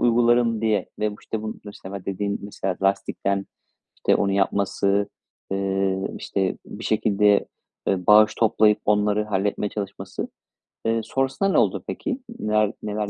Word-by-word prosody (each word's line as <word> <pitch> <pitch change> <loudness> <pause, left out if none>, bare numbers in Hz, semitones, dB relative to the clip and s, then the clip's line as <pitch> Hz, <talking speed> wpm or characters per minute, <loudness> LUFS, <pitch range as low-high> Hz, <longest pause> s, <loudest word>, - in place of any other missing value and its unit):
uygularım 120 -1 +3
diye 110 -2 +1
ve 105 0 +1
bu, - - -10
işte, 110 -1 -4
bu, 110 0 -4
mesela, 100 -2 -8
dediğin, 100 +1 -2
mesela, 95 -2 -3
lastikten, 100 0 0 0.5
işte, - - +2
onu 100 -1 +1
yapması, 100 0 +1 0.4
eee, 95 0 0 0.2
işte, 95 -2 -1
bir 110 - -8
şekilde, 105 -1 +3 0.4
e, 90 -2 0
bağış 105 +1 +7
toplayıp 110 -2 +4
onları 105 0 +2
halletmeye 100 0 -1
çalışması. 100 -2 -5 0.6
Eee, 115 0 +2
sonrasında 135 +9 0
ne - - +2
oldu - - +2
peki? 280 -4 -3 0.2
Neler 105 0 +2
neler 105 -1 -2
105 Hz, 140 wpm, -24 LUFS, 100-110 Hz, 0.6 s, bağış